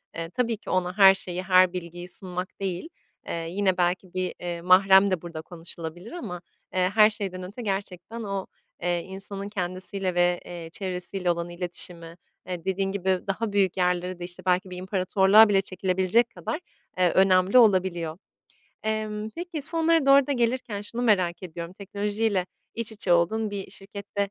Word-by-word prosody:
eee, 165 0 -5
tabii 230 +2 -1
ki - - -12
ona 185 +1 -1
her 195 -1 +8
şeyi, 180 -1 -4
her 185 -1 +5
bilgiyi 175 0 -7
sunmak 180 +1 -7
değil, 190 - -4 0.4
eee, - - -4 0.2
yine 190 0 0
belki 180 +1 -1
bir, 185 -1 -2
eee, 175 -1 -5
mahrem 190 +2 +6
de 180 - 0
burada 165 -2 -7
konuşulabilir 170 +3 -8
ama, 205 - -6 0.3
eee, 185 0 +2
her 215 0 +7
şeyden 190 -3 -5
önce 200 +7 -8
gerçekten 200 +2 -4
o, 195 -2 -4 0.3
eee, 175 -1 0
insanın 195 +1 -7
kendisiyle 185 -1 -3
ve, 175 0 +2
eee, 170 -2 -8
çevresiyle 180 -1 -2
olan 170 0 -3
iletişimi, 175 -1 -4 0.3
eee, 180 -2 -5
dediğin 195 0 -1
gibi, 190 -1 0
daha 210 +3 -2
büyük 195 -2 +2
yerlere 180 0 0
de, - - -6
işte, 180 +1 -5
belki 185 +1 +1
bir 180 - -7
imparatorluğa 190 +3 +4
bile 195 -1 +4
çekilebilecek 190 +4 +1
kadar, 315 - -5 0.4
eee, 180 -2 +3
önemli 190 +3 +4
olabiliyor. 185 -7 +3 0.7
Emm, 215 0 -3
peki 335 -1 -5
sonlara 325 -1 +7
doğru 275 -1 +6
da 285 - 0
gelirken 235 -4 -1
şunu 235 +3 -5
merak 185 -7 +2
ediyorum: 170 0 -7
Teknolojiyle 205 0 -2 0.3
iç 230 -1 -3
içe 195 -4 +2
olduğun 210 +6 +2
bir 195 -2 -6
şirkette, 200 0 -5
190 Hz, 165 wpm, -26 LUFS, 180-205 Hz, 0.7 s, her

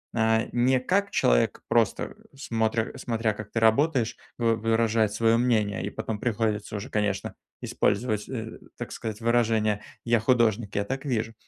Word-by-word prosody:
э, 110 0 +2
не 125 +2 +3
как 200 +10 +1
человек, - - +2
просто - - +1 0.2
смотря 115 -4 -1
смотря, 115 -2 -1
как 105 0 -9
ты 115 - 0
работаешь, 120 +1 +2 0.2
вы 115 -1 +2
выражает 115 -1 +1
свое 115 +1 +3
мнение, 110 -6 +1
и - - -2
потом 105 0 -4
приходится 110 -3 -1
уже, 100 - -7
конечно, 105 -2 -1 0.3
использовать, 105 -1 0
э, 115 -4 -6 0.2
так - - -6
сказать, 110 0 -6
выражение 110 -3 +2 0.2
"я 120 -1 +3
художник, 115 -3 +1
я 100 0 0
так 135 +3 -4
вижу", 115 -4 -1
115 Hz, 150 wpm, -26 LUFS, 110-120 Hz, 0.3 s, не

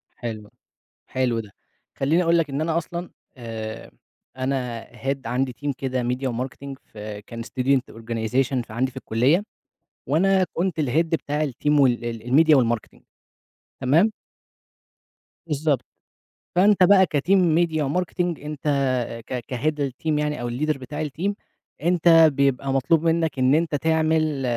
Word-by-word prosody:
حلو، 110 -3 -6 0.6
حلو 125 -3 0
ده، 105 - -10 0.4
خليني 160 +6 +2
أقول 170 0 +3
لك 160 -3 0
إن 140 +2 -2
أنا 160 +1 +1
أصلًا، 170 +2 -5 0.3
آآ، 115 -2 -7 0.5
أنا 130 -3 -3 0.2
head 135 0 -2
عندي 130 +1 -1
team 145 - +1
كده 130 -2 -2
ميديا 125 +2 -1
وmarketing 130 +3 -5
في 105 -1 -8
كان 115 -1 -7
student 130 +2 +1
organization 120 +3 -1
ف - - -12
عندي 130 +4 0
في - - -23
الكلية، 130 - +2 0.6
وأنا 185 +7 +3
كنت 175 -2 -1
الhead 150 +4 +2
بتاع 155 -2 -1
الteam 145 +3 +1
وال 120 -3 +3
ال 115 -1 -5
الميديا 155 +4 +5
والmarketing 120 -3 -1 0.8
تمام؟ 165 +12 +3 1.4
بالضبط، 150 -4 0 0.7
فأنت 200 +1 +5
بقى 190 0 +6
كteam 145 +6 -1
ميديا، 170 -4 +3
وmarketing 180 +5 -2 0.2
أنت 150 -1 -6 0.7
ك 125 -1 -3
كhead 145 +2 0
الteam 150 +4 -2
يعني 150 -3 -1
أو 120 - -3
الleader 150 +5 -1
بتاع 140 +4 -5
الteam، 175 +9 -2 0.5
أنت 175 +1 +2 0.2
بيبقى 135 -1 +1
مطلوب 145 +5 +2
منك 165 -3 +1
إن 130 +2 +4
أنت 160 -1 +1
تعمل 155 -1 +1
140 Hz, 140 wpm, -23 LUFS, 125-160 Hz, 1.4 s, بقى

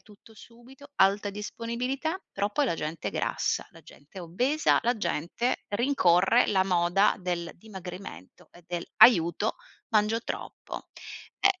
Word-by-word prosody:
tutto 215 +1 -19
subito, 250 +6 -16
alta 200 +1 +3
disponibilità, 240 - -3
però 205 +1 -1
poi 285 +7 +1
la 230 - 0
gente 155 0 -5
è - - -5
grassa, - - -1
la - - -16
gente 145 +7 -15
è - - -6
obesa, 250 - +1
la 240 +1 +1
gente 210 +6 -2
rincorre 205 -2 +3
la 190 -2 +3
moda 180 +2 +3
del 175 -2 -3
dimagrimento 185 - -10
e 175 - -18
del 175 -1 -4
"aiuto 190 -1 +5 0.3
mangio 215 +1 +2
troppo”. - - -7 0.5
Eh, 395 -2 +3
205 Hz, 140 wpm, -27 LUFS, 175-240 Hz, 0.5 s, aiuto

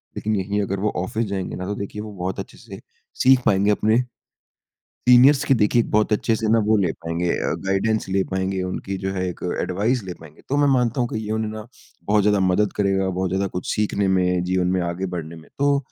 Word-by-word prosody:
लेकिन 110 0 -1
यहीं 100 +1 -1
अगर 100 -1 -2
वो 105 +2 0
ऑफ़िस 110 +5 -2
जाएँगे 100 -2 -4
ना, 90 - -5
तो 100 +2 -3
देखिए, 100 +1 -6
वो 105 0 -7
बहुत 95 0 -4
अच्छे - - -8
से - - -11 0.4
सीख 130 0 +6
पाएँगे, 100 +1 +3
अपने, 110 +2 +2 1.1
सीनियर्स 130 +3 +7
की, 135 - +3
देखिए, 115 0 +3
एक - - -8
बहुत 105 0 +2
अच्छे 110 +2 +1
से 110 - -2
ना, 115 - +5
वो 110 0 +4
ले 95 -5 +1
पाएँगे 85 +1 -1
अ, - - -1
गाइडेंस 100 +3 0
ले 95 0 +1
पाएँगे, 95 0 -1
उनकी 95 +1 -4
जो 95 0 -3
है, 95 -1 -2
एक 90 - -7 0.2
एडवाइस 110 +7 0
ले 90 -2 -6
पाएँगे। 80 -2 -15
तो 140 - 0
मैं 145 0 +3
मानता 125 0 +1
हूँ 120 - 0
कि 110 - -4
ये 105 - -5
उन्हें 110 0 -1
ना, 110 0 -8 0.4
बहुत 105 +1 +3
ज़्यादा 105 0 +3
मदद 95 +2 +2
करेगा, 95 -1 +1
बहुत 95 0 -2
ज़्यादा 95 +2 0
कुछ 90 -1 -5
सीखने 100 -2 0
में, 90 -1 +2
जीवन 90 0 0
में - - 0
आगे 85 +2 -3
बढ़ने 85 -1 -6
में। 80 - -14
तो 140 0 +3
100 Hz, 230 wpm, -22 LUFS, 95-110 Hz, 1.1 s, सीनियर्स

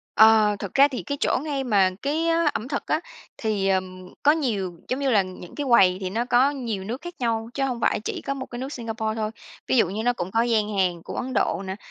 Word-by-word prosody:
Ờ, 220 -1 +6
thực 200 - -6
ra 280 +1 +6
thì 260 - -5
cái 285 -1 -4
chỗ - - +2
ngay 280 -3 -2
mà 200 -5 +3
cái, 315 +4 0
ơ, 330 -1 +2
ẩm 235 +4 -4
thực 280 - -3
á, 310 - +1 0.4
thì 205 -3 0
ờm, 185 -1 -2
có 295 - +6
nhiều 210 - -1
giống 255 +2 -1
như 275 -2 +1
là 205 -4 +4
những 185 -1 -10
cái 290 - -3
quầy 185 -6 +5
thì 185 -1 -3
nó 230 +4 -1
có 250 +3 +4
nhiều 230 -9 -4
nước 240 +6 -5
khác 350 0 -7
nhau, 225 -2 -1
chứ 275 - -2
hông 250 -3 -2
phải - - +1
chỉ - - -5
có 275 - -2
một 260 -1 -6
cái 240 - -8
nước 265 +3 -5
Singapore 225 -2 -3
thôi. 215 -1 -2 0.4
Ví 260 - +1
dụ 225 - +5
như 210 +3 -3
nó 245 +1 +2
cũng 180 -6 -5
có 225 +3 +2
gian 215 -3 0
hàng 175 -3 +1
của - - -8
Ấn 255 +1 -3
Độ 195 -2 +1
nè, 190 +1 -4
225 Hz, 260 wpm, -24 LUFS, 195-265 Hz, 0.4 s, Ờ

